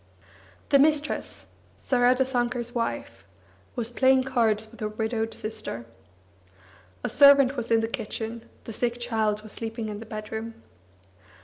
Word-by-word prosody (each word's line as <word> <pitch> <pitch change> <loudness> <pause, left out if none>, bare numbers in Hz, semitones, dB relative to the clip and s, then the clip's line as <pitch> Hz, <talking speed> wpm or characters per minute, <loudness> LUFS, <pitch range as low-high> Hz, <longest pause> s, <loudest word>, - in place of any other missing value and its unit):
The 280 - +6
mistress, 300 +1 +1 0.3
Saradasankar's 245 -1 +1
wife, 120 - -3 0.5
was 235 -1 -1
playing 260 +1 +4
cards 225 -5 +1
with 230 - -15
her 215 - -1
widowed 220 +1 -2
sister. 215 - -5 1.2
A - - 0
servant 280 0 +6
was 240 -3 -4
in 225 -1 +4
the 225 - -1
kitchen, 225 -1 -5
the 225 - -7
sick 240 +1 -1
child 220 -3 0
was 215 - -9
sleeping 225 0 -5
in 205 -1 -5
the 225 - -10
bedroom. 220 +1 -6
230 Hz, 130 wpm, -26 LUFS, 220-250 Hz, 1.2 s, The